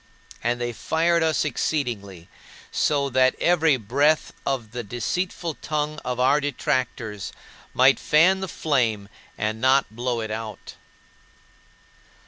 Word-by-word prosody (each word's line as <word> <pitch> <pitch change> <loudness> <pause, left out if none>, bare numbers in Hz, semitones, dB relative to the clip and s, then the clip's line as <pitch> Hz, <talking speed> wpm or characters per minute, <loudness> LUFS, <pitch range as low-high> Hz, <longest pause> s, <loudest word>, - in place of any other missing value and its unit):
And 120 +1 0
they 120 0 -2
fired 165 +7 +1
us 160 -1 +1
exceedingly, 115 - -2 0.4
so 140 -2 +1
that 130 0 +3
every 160 -5 +3
breath 140 +8 +1
of 120 -6 -2
the 120 0 -4
deceitful 160 - -3
tongue 150 0 -2
of 125 -1 -3
our 135 +4 +4
detractors 125 -6 -2 0.4
might 130 +1 +5
fan 180 +5 +4
the 190 - -3
flame 115 - 0 0.3
and 110 +1 -2
not 130 -3 +3
blow 120 0 -1
it 110 -1 -5
out. 110 -1 -6
130 Hz, 120 wpm, -24 LUFS, 115-150 Hz, 0.4 s, might